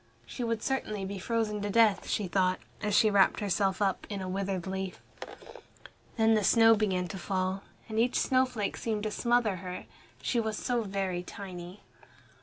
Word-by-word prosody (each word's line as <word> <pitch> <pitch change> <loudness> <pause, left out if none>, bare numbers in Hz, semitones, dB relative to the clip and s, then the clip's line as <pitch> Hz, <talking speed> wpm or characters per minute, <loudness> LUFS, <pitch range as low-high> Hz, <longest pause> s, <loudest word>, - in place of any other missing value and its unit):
She 250 - -5
would 230 -1 -1
certainly 215 -7 -2
be 195 0 -5
frozen 215 0 -1
to 205 - -2
death, 215 -1 +3
she 205 - 0
thought, 185 0 +2 0.2
as 210 -2 0
she 215 0 +5
wrapped 200 -1 +4
herself 200 -1 +1
up 195 -2 -1
in 200 -2 -4
a 185 - -4
withered 190 -1 -2
leaf. 190 -1 -4 1.2
Then 225 0 +4
the 215 -1 +2
snow 225 +3 +6
began 190 -4 0
to 190 - -6
fall, 190 +1 -1 0.3
and 220 -1 -2
each 245 +2 +2
snowflake 255 -5 +1
seemed 215 -2 -2
to 215 - -2
smother 235 -4 +1
her. 180 0 -7 0.3
She 240 - 0
was 220 -1 -2
so 245 -2 0
very 195 -3 -2
tiny. 180 -1 -9
205 Hz, 175 wpm, -30 LUFS, 190-225 Hz, 1.2 s, snow